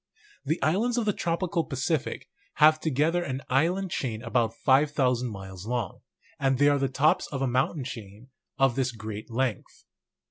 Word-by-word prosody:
The 160 - -1
islands 220 +10 +1
of 235 - +1
the 210 - +2
tropical 170 0 -1
Pacific 140 +2 -2 0.3
make 155 +1 +6
together 160 +3 +1
an 135 -5 -4
island 175 +7 +1
chain 115 -7 -3
about 115 -1 0
5,000 130 -2 +2
miles 95 -1 -8
long; 120 -6 -2 0.4
and 135 -1 +2
they 145 +2 +5
are 145 -1 +2
the 135 - +1
tops 140 +4 +2
of 135 -2 -3
a - - +1
mountain 130 +4 0
chain 115 -3 -9 0.3
of 135 -3 +3
this 130 -2 0
great 110 -1 -7
length. 120 -2 -3
135 Hz, 165 wpm, -27 LUFS, 120-155 Hz, 0.4 s, make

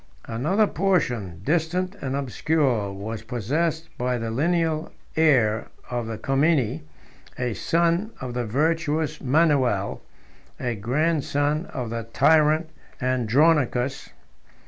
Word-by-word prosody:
Another 155 - +1
portion, 125 - 0
distant 175 - 0
and 135 0 -2
obscure, 135 -5 0
was 105 +3 -6
possessed 150 +8 -2
by 125 0 0
the 115 -1 -3
lineal 160 +4 0 0.2
heir 120 -9 +3 0.2
of 120 -2 -2
the 115 -1 -4
Comneni, 135 -3 +1 0.6
a 125 -2 -1
son 170 - +1
of 125 -1 -5
the 125 0 -1
virtuous 155 +3 0
Manuel, 130 - +2 0.6
a 120 -2 -1
grandson 145 - 0
of 120 -4 -5
the 115 0 -2
tyrant 155 0 +4 0.3
Andronicus. 130 +1 +2
140 Hz, 105 wpm, -24 LUFS, 120-160 Hz, 0.6 s, tyrant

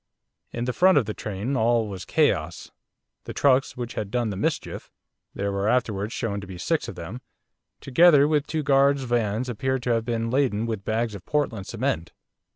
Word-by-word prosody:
In 120 +1 -3
the 125 - -1
front 185 +7 +5
of 130 - +3
the 110 - -4
train 105 +7 -4
all 115 -1 +2
was 95 -3 -7
chaos. - - 0 0.5
The - - -7
trucks 135 -2 +2
which 120 -1 -5
had 105 - -4
done 120 -1 -1
the - - -4
mischief - - -3 0.5
there 100 0 -2
were 100 +2 0
afterwards 110 -4 0
shown 100 -5 -3
to 100 - -9
be 95 -1 -8
six - - -1
of - - -7
them, - - -7 0.6
together 145 +1 +5
with 150 -1 +1
two 155 -1 -2
guards' 140 0 +3
vans 120 -1 0
appeared 130 +2 -2
to 125 - 0
have 115 -1 0
been 115 -1 -2
laden 125 -5 +1
with 110 -4 -4
bags 110 +1 -1
of 100 - -9
Portland 125 -10 -1
cement. 120 -7 -2
120 Hz, 190 wpm, -25 LUFS, 105-135 Hz, 0.6 s, front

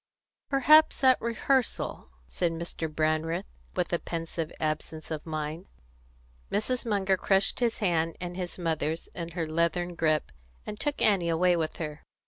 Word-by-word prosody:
"Perhaps 295 +3 +5
at 260 -1 +5
rehearsal," 235 - 0 0.2
said 165 - -1
Mr. 165 -1 -4
Brandreth, 155 +1 0 0.3
with - - -1
a - - +2
pensive 165 -1 -4
absence 155 +1 -3
of 155 +1 -4
mind. 155 +2 -4 0.8
Mrs. 245 +3 +1
Munger 195 -3 +2
crushed 195 +1 +2
his 235 -2 +1
hand 165 -5 0
and 175 0 -5
his 180 -1 -4
mother's 160 -2 -2
in 170 -1 -5
her 170 -2 -1
leathern 170 +2 0
grasp, 155 -3 +1 0.3
and 210 0 -6
took 290 -1 0
Annie 190 -5 +4
away 175 +2 +3
with 160 -2 -2
her. 155 -2 -5
170 Hz, 145 wpm, -28 LUFS, 160-200 Hz, 0.8 s, Perhaps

